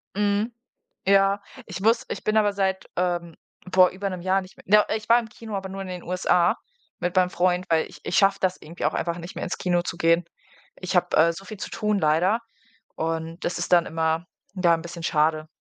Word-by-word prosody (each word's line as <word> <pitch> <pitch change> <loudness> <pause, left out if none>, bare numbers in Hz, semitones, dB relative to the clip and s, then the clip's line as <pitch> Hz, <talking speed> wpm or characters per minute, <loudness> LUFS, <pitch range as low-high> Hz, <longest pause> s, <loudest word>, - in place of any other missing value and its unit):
Mhm. 205 +3 +1 0.6
Ja, 195 0 +4 0.3
ich 190 -1 -6
muss 225 +2 +3
ich - - -5
bin 215 0 +1
aber 205 -1 +3
seit, 190 -1 -1
ähm, 175 -2 -1 0.4
vor 185 -1 +7
über 195 +1 -3
'nem 180 -2 -6
Jahr 190 +1 +2
nicht 185 - -14
mehr - - -17 0.2
do - - -6
äh, - - +1
ich 215 +1 -13
war 235 +1 +7
im 225 -2 -7
Kino, 220 -2 -8
aber 190 -1 -4
nur 195 0 -6
in 190 - -6
den 180 -1 -6
USA 180 -1 +2 0.4
mit 175 +1 -2
meinem 180 -1 +4
Freund, 180 0 +1
weil 160 -1 +2
ich - - -14
ich 180 - -2
schaffe 195 0 +4
das 185 -1 +1
irgendwie 165 0 -6
auch 155 - +1
einfach 170 0 -2
nicht 170 +1 -9
mehr - - -4
ins - - -3
Kino 175 -1 +1
zu 170 - -5
gehen. 165 +1 +3 0.6
Ich 185 0 -3
habe, 180 - +2
äh, 165 +1 +5
so 195 +4 -10
viel 215 - -8
zu - - -6
tun 210 -2 0
leider 170 +8 +2 0.6
und 165 +1 -3
das 175 - -1
ist 175 - -4
dann 175 -1 +5
immer, 160 +1 -1 0.3
ja, 175 -3 +4
'n 165 - -4
bisschen 170 0 -8
schade. 155 0 +1
180 Hz, 230 wpm, -25 LUFS, 170-195 Hz, 0.6 s, vor